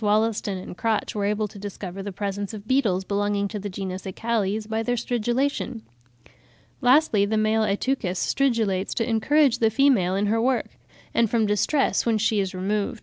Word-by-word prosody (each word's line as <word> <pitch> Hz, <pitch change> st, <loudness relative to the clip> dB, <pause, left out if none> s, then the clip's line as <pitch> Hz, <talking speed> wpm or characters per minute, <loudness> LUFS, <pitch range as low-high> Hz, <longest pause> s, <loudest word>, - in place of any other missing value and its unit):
Wollaston 210 Hz, -1 st, +1 dB
and 185 Hz, -, -8 dB
Crotch 225 Hz, +2 st, -1 dB
were 205 Hz, -2 st, -1 dB
able 210 Hz, +1 st, 0 dB
to 205 Hz, 0 st, -12 dB
discover 195 Hz, -1 st, -6 dB
the 200 Hz, +1 st, -5 dB
presence 200 Hz, +2 st, -4 dB
of 210 Hz, 0 st, -10 dB
beetles 225 Hz, -8 st, +2 dB
belonging 200 Hz, +1 st, 0 dB
to 210 Hz, -, -5 dB
the 205 Hz, +1 st, -5 dB
genus 190 Hz, -1 st, -5 dB
Acalles 215 Hz, +1 st, -1 dB
by 220 Hz, 0 st, -1 dB
their 245 Hz, +2 st, 0 dB
stridulation. 240 Hz, +1 st, -1 dB, 1.0 s
Lastly, 250 Hz, -5 st, +4 dB
the 215 Hz, +2 st, 0 dB
male 215 Hz, +1 st, +2 dB
Ateuchus 205 Hz, -2 st, -1 dB
stridulates 225 Hz, -9 st, 0 dB
to 230 Hz, -, 0 dB
encourage 250 Hz, +3 st, +3 dB
the 225 Hz, -, +4 dB
female 225 Hz, -7 st, +3 dB
in 200 Hz, +1 st, +1 dB
her 225 Hz, +2 st, +1 dB
work, 255 Hz, +1 st, +1 dB, 0.4 s
and 230 Hz, -2 st, +2 dB
from 225 Hz, -1 st, +2 dB
distress 210 Hz, +7 st, +1 dB
when 230 Hz, -2 st, +1 dB
she 215 Hz, 0 st, +1 dB
is 190 Hz, -2 st, -2 dB
removed. 185 Hz, +2 st, -3 dB
(79. 210 Hz, -1 st, +1 dB
M. -, -, -8 dB
P. -, -, -15 dB
215 Hz, 190 wpm, -24 LUFS, 200-235 Hz, 1.0 s, Lastly